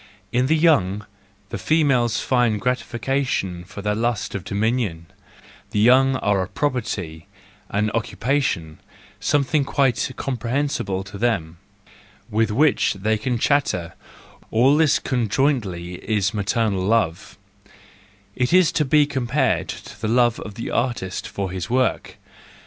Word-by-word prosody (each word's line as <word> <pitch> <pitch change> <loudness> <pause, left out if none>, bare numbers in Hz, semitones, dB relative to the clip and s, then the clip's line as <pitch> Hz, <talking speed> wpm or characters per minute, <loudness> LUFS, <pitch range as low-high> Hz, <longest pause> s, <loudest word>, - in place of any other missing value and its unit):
In 125 +2 +2
the 160 +3 +3
young, 105 - +2 0.4
the - - -5
females 135 -8 +2
find 120 -5 +1
gratification 125 -6 -1
for 100 +2 -10
their 105 0 +1
lust 115 0 -1
of 95 - -4
dominion; 105 -5 -1 0.6
the 105 - -1
young 130 +4 +5
are 100 -5 +1
a 95 - -3
property, 95 - -3 0.4
an 105 +1 0
occupation, 115 - -1 0.4
something 145 +1 +1
quite 135 -2 +1
comprehensible 120 -6 -2
to 100 +1 -10
them, 90 -9 -1 0.7
with 110 +1 +2
which 135 +1 +2
they 105 +3 0
can 125 +2 -1
chatter: 115 - 0 0.6
all 130 +6 +4
this 155 -2 +4
conjointly 115 -7 -1
is 105 -3 0
maternal 105 -1 0
love,— 95 -5 0 1.0
it 125 -1 0
is 185 -2 +5
to 150 - +1
be 150 +2 +4
compared 130 -2 0
to - - -9
the 110 - -1
love 120 0 +3
of 105 - -8
the 115 - -5
artist 120 -7 -2
for 95 -2 -4
his 95 +3 -5
work. 125 0 0
115 Hz, 130 wpm, -22 LUFS, 100-130 Hz, 1.0 s, young